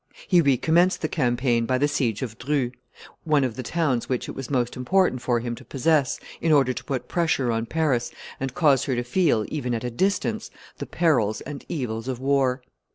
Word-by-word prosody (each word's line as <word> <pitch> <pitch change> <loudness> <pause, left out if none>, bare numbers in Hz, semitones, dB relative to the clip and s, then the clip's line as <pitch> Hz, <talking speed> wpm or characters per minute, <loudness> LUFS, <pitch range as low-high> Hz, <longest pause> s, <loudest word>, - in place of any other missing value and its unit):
He 180 -3 +5
recommenced 160 +7 +3
the - - +2
campaign 120 -5 +1
by 130 - +2
the 145 +3 +2
siege 135 -7 -1
of 115 -2 -6
Dreux, 130 -1 0 0.5
one 150 -4 +2
of 125 -4 -2
the 130 - -4
towns 135 -3 -1
which 125 -2 -1
it - - -4
was 135 -2 -7
most 125 -3 0
important 130 0 +1
for 120 -1 +1
him 120 0 -3
to - - -10
possess 140 0 +1 0.2
in 165 - +2
order 135 -4 +4
to - - -7
put 135 -4 -4
pressure 155 -8 +1
on 115 0 -1
Paris, 150 -6 0 0.3
and 135 -1 -4
cause 145 -6 +3
her 130 - 0
to 120 - -1
feel, 125 - +2
even 125 -6 -2
at 115 - -4
a 125 - -3
distance, 185 - -1 0.3
the - - -5
perils 125 -11 +1
and 145 -2 -8
evils 120 -6 -3
of 130 -2 -3
war. 135 -1 +1
130 Hz, 205 wpm, -24 LUFS, 120-150 Hz, 0.5 s, He